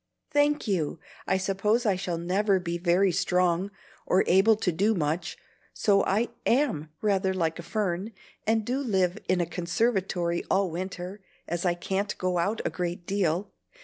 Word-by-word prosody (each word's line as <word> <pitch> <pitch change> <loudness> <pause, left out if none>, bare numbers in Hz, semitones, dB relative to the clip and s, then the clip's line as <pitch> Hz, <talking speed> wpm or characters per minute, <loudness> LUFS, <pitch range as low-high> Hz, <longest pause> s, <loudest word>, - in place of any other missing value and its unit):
"Thank 290 -2 +2
you! 170 -5 -1 0.3
I 190 - +2
suppose 200 +5 +1
I 205 -3 +3
shall 180 -2 -3
never 190 +3 +1
be 170 -1 -3
very 180 +2 +3
strong 180 +2 +1 0.4
or 185 - +4
able 195 +5 +5
to 200 -3 0
do 200 +7 +2
much; 165 +1 -2 0.4
so 200 -2 +3
I 215 +5 +1 0.2
AM 230 - +1
rather 190 -2 +1
like 165 -2 -1
a - - -3
fern, 195 +1 -2 0.4
and 220 -1 +2
do 255 +4 -1
live 190 -7 +1
in 185 -1 +3
a - - +1
conservatory 180 -1 0
all 190 -2 +2
winter, 185 +3 -5 0.3
as 175 +2 -2
I 175 - +2
can't 195 +4 -2
go 180 -1 0
out 200 +6 0
a - - +2
great 175 -1 -4
deal. 190 -1 0
190 Hz, 165 wpm, -27 LUFS, 175-205 Hz, 0.4 s, able